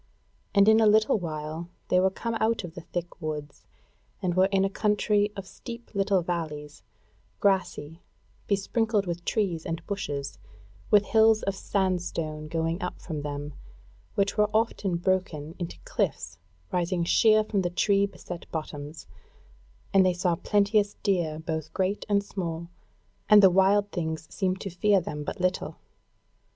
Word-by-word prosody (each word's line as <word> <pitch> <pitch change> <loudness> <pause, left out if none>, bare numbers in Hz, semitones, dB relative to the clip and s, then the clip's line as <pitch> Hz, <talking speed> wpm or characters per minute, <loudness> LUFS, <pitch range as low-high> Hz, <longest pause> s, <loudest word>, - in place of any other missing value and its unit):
And 200 0 +6
in 220 0 +7
a 220 - +5
little 215 +1 +4
while 160 0 -5 0.2
they 180 - +4
were 190 +1 +4
come 230 +4 -4
out 225 -1 +1
of 170 -2 -7
the 170 - -8
thick 175 +1 -6
woods 150 -2 -6 0.5
and 180 -2 -1
were 185 +2 +4
in 195 -1 +2
a - - +3
country 210 0 +1
of 195 -1 -6
steep 235 +4 -10
little 195 -2 +2
valleys, 150 -4 -4 0.6
grassy, 185 -6 0 0.5
besprinkled 210 +1 +1
with 175 -1 -4
trees 185 -7 0
and 165 -2 -4
bushes, 145 -9 -4 0.5
with 205 -1 +5
hills 220 +1 +4
of 195 - 0
sandstone 175 -6 -2
going 165 +3 -1
up 180 - -4
from 155 -4 -5
them, 145 0 -5 0.6
which 200 +1 0
were 210 0 +4
often 210 -5 +1
broken 170 -4 -1
into 170 - -5
cliffs 85 -1 -2 0.3
rising 175 0 0
sheer 215 +5 +5
from 210 -2 -1
the 175 - 0
tree 200 +3 +2
beset 175 -3 -9
bottoms: 155 -1 -6 0.9
and 195 -1 +6
they 185 -1 +3
saw 175 0 +1
plenteous 205 +2 +2
deer 170 -6 +1
both 160 -1 -4
great 190 +2 -1
and 200 -1 +3
small, 170 -4 -5 0.6
and 210 -1 +8
the 190 - +8
wild 200 +2 +3
things 160 -2 -3
seemed 190 -1 0
to 195 - -5
fear 200 +3 +3
them 150 -4 -5
but 195 - -5
little. 185 0 -1
185 Hz, 155 wpm, -27 LUFS, 165-205 Hz, 0.9 s, and